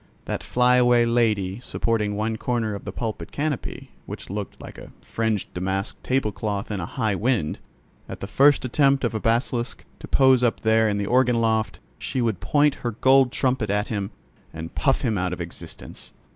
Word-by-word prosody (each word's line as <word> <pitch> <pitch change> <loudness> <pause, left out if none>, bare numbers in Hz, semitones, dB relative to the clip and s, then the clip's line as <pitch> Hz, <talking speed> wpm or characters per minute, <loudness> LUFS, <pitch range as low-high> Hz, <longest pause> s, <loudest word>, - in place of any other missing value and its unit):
That - - -3
flyaway 125 -1 +4
lady 110 -4 +1
supporting 110 -4 -1
one 110 +2 -1
corner 115 -1 -1
of 100 - -7
the 105 - -4
pulpit 105 -6 -5
canopy, 145 -3 -4 0.2
which - - -8
looked 100 -1 -5
like - - -10
a - - -11
fringed 110 -3 -2
damask 95 +2 -2
table 130 -5 0
cloth 105 0 -3
in 100 - -2
a 85 - -4
high 110 -2 -1
wind, 105 -5 0 0.5
at - - -7
the - - -5
first 135 +7 +4
attempt 135 +2 +2
of 120 - 0
a 110 - -1
basilisk 120 +2 -1 0.2
to - - -9
pose 130 -2 +5
up 120 -2 +1
there 110 0 +3
in 100 - 0
the 100 - -1
organ 125 +1 +3
loft, 110 -1 0 0.2
she 130 - -3
would 115 -6 0
point 145 -1 +3
her 120 -2 -2
gold 130 +2 +4
trumpet 130 -6 0
at 105 +1 0
him, 100 -3 -2 0.4
and 80 +1 -7
puff 135 -2 +1
him 110 -7 0
out 90 0 -1
of 90 - -6
existence! 85 -1 -8
115 Hz, 185 wpm, -24 LUFS, 100-125 Hz, 0.5 s, pose